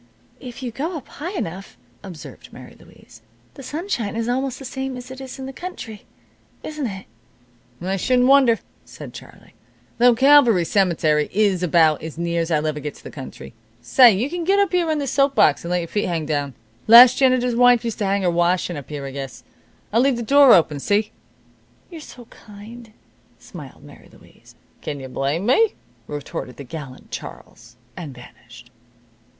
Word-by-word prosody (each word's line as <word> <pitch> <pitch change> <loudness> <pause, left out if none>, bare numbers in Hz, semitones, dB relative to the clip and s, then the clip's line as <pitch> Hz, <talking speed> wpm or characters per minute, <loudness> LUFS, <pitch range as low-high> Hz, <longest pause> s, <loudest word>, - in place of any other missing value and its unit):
"If 250 0 -10
you 245 - -4
go 320 +9 -4
up 285 -2 -11
high 335 +7 -7
enough," 185 - -6 0.2
observed 175 -7 -11
Mary - - -13
Louise, 115 - -18 0.3
"the - - -12
sunshine 275 - -4
is 230 0 -2
almost 260 +1 -2
the 270 - -10
same 265 0 -5
as 250 +1 -10
it 260 +1 -9
is 265 0 -9
in 265 - -7
the 270 - -8
country, 250 - -9 0.6
isn't 305 -4 -4
it?" 195 -2 -8 0.8
"I 190 +2 -2
shouldn't 250 +5 +2
wonder," 265 -4 +5 0.3
said - - -11
Charlie, - - -14 0.5
"though 245 0 +5
Calvary 255 -8 +5
cemetery 160 -6 +1
is 200 -3 +1
about 160 -3 +3
as 160 0 -8
near's 170 -1 -2
I'll 155 -2 0
ever 155 -1 -2
get 150 0 -6
to - - -17
the - - -9
country. 135 -4 -10 0.3
Say, 250 -3 +6
you 210 +6 -1
can 345 +3 -5
set 395 +1 +2
here 355 -3 +1
on 310 - 0
this 280 -3 -3
soap 275 0 +2
box 145 - +3
and 170 - -6
let 180 - +1
your 170 -1 -3
feet 205 +4 -2
hang 165 -3 -2
down. 145 -4 -3 0.3
The 220 - +3
last 245 +1 +9
janitor's 255 -2 +2
wife 245 -1 +4
used 230 - -4
to 205 - -1
hang 195 0 0
her 175 - +2
washin' 175 0 0
up 140 - -10
here, 145 -2 -6
I 135 - -6
guess. 135 -2 -8 0.5
I'll 230 - +4
leave 270 0 +2
this 235 - -5
door 280 +1 +7
open, 155 -4 +1
see?" 205 +7 0 0.8
"You're 330 -2 -9
so 245 -4 -13
kind," 220 +2 -14 0.5
smiled - - -12
Mary - - -16
Louise. - - -20 0.3
"Kin 145 - -5
you 130 -1 -9
blame 140 +8 -2
me?" 430 - +3 0.3
retorted 145 -3 -7
the 140 - -8
gallant 140 -1 -10
Charles. - - -10 0.2
And 145 -6 -8
vanished. 120 0 -16
215 Hz, 185 wpm, -21 LUFS, 160-260 Hz, 0.8 s, last